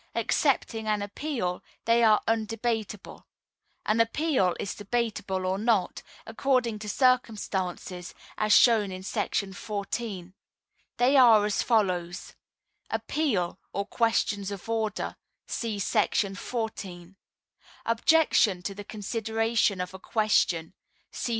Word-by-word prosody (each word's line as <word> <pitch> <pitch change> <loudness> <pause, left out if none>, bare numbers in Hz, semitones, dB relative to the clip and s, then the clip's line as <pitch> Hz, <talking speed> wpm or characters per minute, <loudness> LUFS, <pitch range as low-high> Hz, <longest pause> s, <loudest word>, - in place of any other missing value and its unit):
Excepting 230 -1 0
an 210 -1 +1
Appeal, 205 -4 -3 0.2
they 230 +1 +4
are 215 -2 +5
undebatable; 225 -2 -2 0.6
an 215 +2 +1
Appeal 230 - +1
is 200 - -3
debatable 205 -3 -2
or 190 +1 0
not, 220 -4 +1 0.2
according 235 -1 0
to 210 0 -6
circumstances, 200 -8 0 0.2
as 215 0 0
shown 215 -4 +5
in 185 0 -7
§ 195 0 -2
14. 200 -3 -5 0.6
They 260 +3 +4
are 225 -5 +7
as 210 -2 0
follows: 185 -6 0 0.6
Appeal 200 - -1
(or 200 +1 -2
Questions 210 -3 0
of 200 +1 -7
Order)……………………… 225 -2 -2 0.3
See 225 -3 -3
§ 200 0 +1
14. 195 -6 -5 0.7
Objection 230 - +3
to 195 - -3
the 205 +1 -8
Consideration 220 0 -1
of 180 +1 -4
a 190 - -9
Question…………. 190 -6 +1
215 Hz, 110 wpm, -27 LUFS, 195-230 Hz, 0.7 s, are